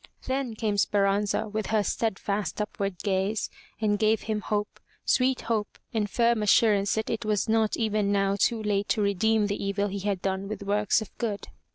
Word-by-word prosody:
Then 260 -3 -2
came 215 -2 -1
Speranza 200 +2 +1
with 215 0 -3
her 215 -1 +2
stead 220 0 -1
fast 205 0 -2
upward 200 -3 -3
gaze, 195 +1 0 0.3
and 205 -2 +1
gave 220 0 +3
him 215 -1 -2
hope, 210 -1 -2 0.3
sweet 260 0 +2
hope 220 -3 -2 0.2
and 210 -2 0
firm 235 0 +2
assur 210 +1 +5
ance 200 0 +1
that 220 0 -2
it 230 - -2
was 215 -2 0
not 220 -1 +2
even 215 -3 +1
now 195 -1 +2
too 220 +2 +1
late 205 -1 0
to 220 - +1
redeem 210 +2 +2
the 205 0 -2
evil 200 +1 0
he 200 +1 -4
had 200 -1 -1
done 190 0 -1
with 210 0 -5
works 205 +2 +2
of - - -16
good. 215 -4 -3
210 Hz, 195 wpm, -27 LUFS, 200-220 Hz, 0.3 s, assur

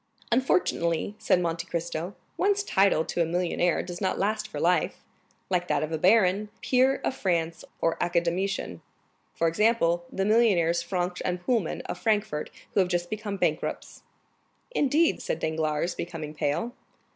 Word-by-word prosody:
"Unfortunately," 180 -7 +1
said 180 - +3
Monte 170 0 -2
Cristo, 170 +2 -3 0.2
"one's 405 +1 +2
title 195 - +3
to 175 - -1
a - - +5
millionaire 175 0 +1
does 175 +1 -7
not 190 - 0
last 215 +2 0
for 215 - -6
life, 180 +1 +1 0.4
like 180 -1 0
that - - +1
of 155 0 -3
baron, 200 0 +4
peer 260 +1 +3
of - - 0
France, 170 -5 -1 0.2
or 165 - 0
academician; 175 - -1 0.5
for 165 - +2
example, 175 -2 +2
the 195 - -1
millionaires 195 -7 +3
Franck 180 0 -2
& 180 0 -6
Poulmann, 225 -10 0
of - - -6
Frankfurt, 210 -8 0 0.2
who - - +2
have 185 -2 +3
just 175 -1 -1
become 210 -2 -3
bankrupts." - - -2 0.7
"Indeed?" 315 - +2
said - - -2
Danglars, 160 +1 -1
becoming 160 -3 -6
pale. 150 +11 -1
180 Hz, 145 wpm, -27 LUFS, 170-210 Hz, 0.7 s, a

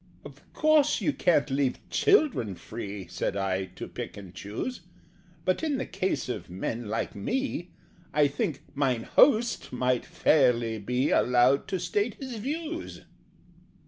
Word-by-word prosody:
"Of - - -14
course 310 -1 +4
you 300 - 0
can't 155 -6 +2
leave 135 -1 +1
children 285 - +3
free," 100 -1 -7
Said 100 - -3
I, 95 -1 0
"to - - -6
pick - - -7
and 95 -3 -10
choose: 105 - -5 0.6
But, 185 - +1
in 305 -4 0
the 260 - -2
case 185 -8 -2
of 105 -8 -5
men 110 +6 -4
like 110 +1 -2
me, 180 - -2 0.4
I 150 -1 +4
think 145 0 -3
'Mine 130 -5 0
Host' 235 -4 +3
might 125 0 +1
fairly 120 -6 +2
be 125 +6 0
Allowed 125 +3 +4
to 190 - -2
state 205 +6 -1
his 260 -4 -6
views." 320 +8 -4
140 Hz, 145 wpm, -28 LUFS, -, 0.6 s, course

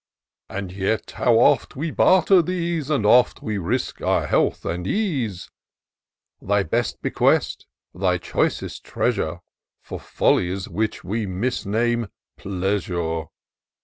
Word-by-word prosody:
And 95 -2 -5
yet 100 +3 -2
how 120 -3 +2
oft 115 - +3
we 155 +4 -3
barter 185 +2 +5
these; 170 -3 -2
How 145 -7 0
oft 120 +4 +4
we 105 -2 -2
risk 110 +9 -2
our - - +1
health - - +1
and 85 +2 -3
ease, 135 - -2 0.9
Thy 100 0 +1
best 115 +7 -2
bequest, - - +1 0.3
thy 90 -1 +1
choicest 85 - -2
treasure. - - -1 0.4
For - - -7
follies 95 +2 0
which 110 +5 -2
we 105 +4 -2
misname 115 +3 -1 0.3
pleasure! 90 -4 -2
105 Hz, 115 wpm, -23 LUFS, 95-125 Hz, 0.9 s, barter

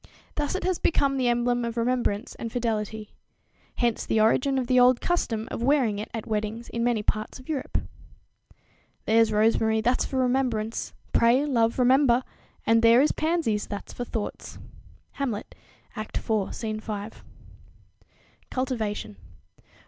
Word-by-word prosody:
Thus 295 +3 -2
it 375 - -3
has 370 -1 0
become 275 -4 +2
the 255 -2 +1
emblem 240 0 +1
of 235 0 -4
remembrance 235 -2 0
and 230 - -6
fidelity. 220 -3 -3 0.6
Hence 235 -2 0
the 220 - +1
origin 255 +5 +3
of 260 - 0
the 255 +1 +3
old 250 0 +5
custom 230 -11 -1
of - - -4
wearing 245 -6 +2
it 215 - -5
at 225 -2 -5
weddings 215 +2 -3
in 235 - -2
many 235 -3 +1
parts 215 +1 -2
of 255 - -15
Europe. 285 -4 -2 1.3
"There's 225 0 +4
rosemary, 220 +1 +3
that's 240 +3 +2
for 265 - -3
remembrance; 245 -4 0 0.2
pray, 240 +5 +4
love, 230 -5 +1
remember: 255 0 +4 0.4
And 225 0 +4
there 230 +1 +6
is 300 - +3
pansies, 310 -10 0
that's 205 - -7
for 245 - -4
thoughts." 225 -3 -5 0.6
Hamlet, 235 -7 -3 0.4
Act 215 -1 -4
iv, 215 -3 -1
Scene 215 -2 -3
5. 215 0 -6 1.3
_Cultivation. 220 - -3
235 Hz, 145 wpm, -26 LUFS, 220-255 Hz, 1.3 s, there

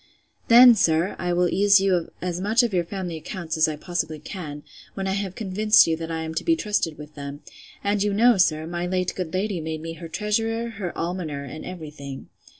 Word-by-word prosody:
Then, 240 +1 +9
sir, 175 -4 +2
I 175 0 -1
will 175 0 +2
ease 200 +2 +5
you 195 0 +2
of 175 -2 0
as 180 -1 -2
much 220 +5 +3
of 235 -4 -1
your 175 -2 +2
family 175 -1 -5
accounts, 170 0 -5
as 160 0 +3
I 155 - -2
possibly 160 -1 -3
can, 150 -2 -7 0.3
when 195 - -3
I 190 - 0
have 195 -1 -3
convinced 215 +1 +4
you 165 - +1
that 165 0 -6
I 160 0 -3
am 160 0 -5
to 160 - -2
be 330 - +3
trusted 205 - -1
with 150 0 -11
them; 140 0 -8 0.4
and 200 0 +1
you 205 0 +1
know, 230 +3 +4
sir, 160 -4 +2
my 175 +1 -3
late 185 0 -1
good 180 -4 -4
lady 190 -1 -2
made 160 0 -5
me 165 0 -5
her 165 0 -9
treasurer, 225 +6 -1
her 200 -5 -5
almoner, 165 -5 -3
and 140 +3 -8
every 165 -5 -7
thing. 140 -2 -9
180 Hz, 225 wpm, -24 LUFS, 160-200 Hz, 0.4 s, Then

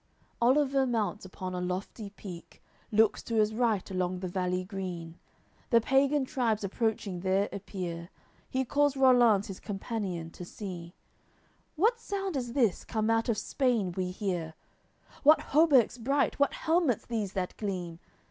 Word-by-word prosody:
AOI. - - -43
LXXX - - -38 0.2
Oliver 270 -2 +2
mounts 210 -5 -1
upon 185 0 -6
a 180 - -3
lofty 185 +4 -4
peak, 190 -4 -11 0.3
Looks 220 0 +3
to 230 - -4
his 215 0 +3
right 220 -4 0
along 185 -1 -1
the 185 0 -4
valley 180 0 -1
green, 180 -4 -6 0.5
The 235 - +6
pagan 270 +3 +2
tribes 235 -6 0
approaching 200 -2 -1
there 190 +2 +1
appear; 180 -4 -5 0.4
He 260 0 0
calls 285 +2 +2
Rollanz, 240 -6 +5
his 195 - -7
companion, 195 -5 -4
to 180 - -9
see: 175 -2 -8 0.8
"What 445 +9 +2
sound 390 -5 -3
is 245 -3 -3
this, 235 -9 +2
come 220 0 0
out 225 +2 +1
of 225 - +1
Spain, 235 -9 0
we 185 -1 -1
hear, 180 -4 -3 0.7
What 305 +2 +7
hauberks 280 -6 +5
bright, 275 +5 +1
what 280 - +2
helmets 320 - +1
these 215 -5 -3
that 185 -2 -3
gleam? 180 -5 -4
210 Hz, 155 wpm, -30 LUFS, 185-255 Hz, 0.8 s, What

